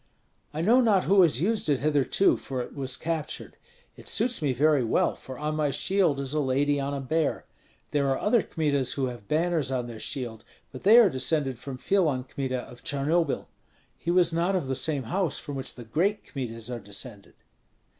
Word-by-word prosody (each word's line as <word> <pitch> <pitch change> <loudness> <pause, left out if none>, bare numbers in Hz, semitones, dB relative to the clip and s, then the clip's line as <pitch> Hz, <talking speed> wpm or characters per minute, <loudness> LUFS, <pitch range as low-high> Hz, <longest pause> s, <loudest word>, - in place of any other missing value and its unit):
"I 155 - -3
know 235 +9 +5
not 210 -6 +3
who 195 0 +5
has 155 -7 +3
used 210 -2 0
it 140 -3 +2
hitherto, 150 +5 +3
for 130 -2 -5
it - - -11
was 135 -3 -2
captured. 160 -2 -4 0.4
It - - -13
suits 235 -2 0
me 145 -3 +1
very 145 +1 +3
well, 115 - +2
for 130 -1 -10
on 150 +1 -2
my 150 -1 +1
shield 175 -1 +1
is 135 0 -3
a 155 - +1
lady 145 +1 +1
on 140 +1 -2
a - - -3
bear. 155 +3 -1 0.5
There 140 -2 +1
are 135 - +1
other 220 +2 +3
Kmitas 140 -7 0
who 135 - -1
have 110 -4 -14
banners 160 -2 +1
on 130 -2 -1
their 115 -2 -8
shield, 115 -4 -5 0.3
but 130 - -9
they 215 +4 +7
are 235 -3 +8
descended 130 -1 0
from 135 0 -7
Filon 155 -6 +1
Kmita 130 -1 -3
of 125 - -14
Charnobil; 145 +2 0 0.5
he 170 - -6
was 175 -1 +3
not 175 +4 +1
of 180 - 0
the 135 - -2
same 140 0 -1
house 170 - -1
from 145 - -6
which 135 -1 -6
the 120 - -9
great 185 - 0
Kmitas 115 -3 -5
are 120 - -4
descended." 105 +1 -7
145 Hz, 200 wpm, -27 LUFS, 130-170 Hz, 0.5 s, are